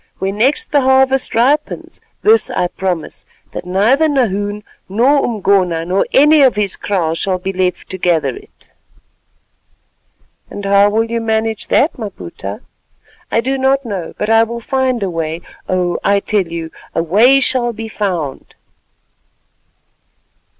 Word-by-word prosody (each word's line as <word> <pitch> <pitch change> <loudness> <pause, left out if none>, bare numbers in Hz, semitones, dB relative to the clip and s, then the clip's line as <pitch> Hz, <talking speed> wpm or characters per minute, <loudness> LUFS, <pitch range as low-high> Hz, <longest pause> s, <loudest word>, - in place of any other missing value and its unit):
When 195 +2 -3
next 290 - +1
the 290 -2 +3
harvest 265 -1 +2
ripens, 275 +6 0 0.2
this 445 +2 +4
I 180 - -1
promise, 180 -4 -4 0.2
that - - -6
neither 235 +12 +3
Nahoon 205 -6 -1 0.3
nor 255 +8 +3
Umgona, 190 -6 +1
nor 185 +3 0
any 300 +2 +5
of 260 -4 +4
his 205 -2 -1
kraal 175 -6 -1
shall 185 +3 -1
be 190 +1 -4
left 185 -1 -1
to 190 - -6
gather 175 - +1
it." 410 +1 -16 1.8
"And 200 - -7
how 200 +1 +4
will 220 +2 +1
you 230 0 -3
manage 220 -1 -1
that, 300 -1 +2
Maputa?" 100 - -7 0.7
"I 230 - +2
do 265 +2 -2
not 270 +1 +1
know, 195 -7 -5
but 210 - -1
I 225 0 +6
will 235 +1 -2
find 255 -1 -1
a 195 - -1
way. 165 0 -3 0.3
Oh! 180 -1 0
I 200 0 +3
tell 200 -2 -1
you, 165 -1 -6 0.2
a 165 - +1
way 225 +11 +5
shall 255 -2 0
be 225 0 -7
found." 180 -10 -4
210 Hz, 145 wpm, -16 LUFS, 185-260 Hz, 1.8 s, I